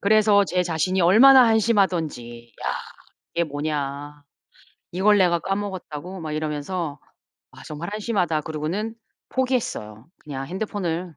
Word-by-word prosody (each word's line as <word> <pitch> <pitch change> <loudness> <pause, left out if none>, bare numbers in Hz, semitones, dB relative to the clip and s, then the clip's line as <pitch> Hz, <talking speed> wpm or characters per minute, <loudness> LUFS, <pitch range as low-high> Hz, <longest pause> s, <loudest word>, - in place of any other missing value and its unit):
그래서 210 -1 +4
제 180 -1 0
자신이 180 +2 0
얼마나 245 +8 +7
한심하던지. 170 - 0
'야, - - +1 0.6
이게 170 - +1
뭐냐. 145 -1 -4 0.7
이걸 205 +4 +3
내가 175 -2 +3
까먹었다고?' 190 -3 -5
막 155 -1 -5
이러면서 155 0 -3 0.5
'아 - - -14
정말 155 +3 -6
한심하다.' 190 -8 -1
그러고는 160 +9 -3 0.4
포기했어요. 215 - -2 0.2
'그냥 135 -2 -5
핸드폰을 180 -2 -3
175 Hz, 300 characters per minute, -23 LUFS, 150-205 Hz, 0.7 s, 얼마나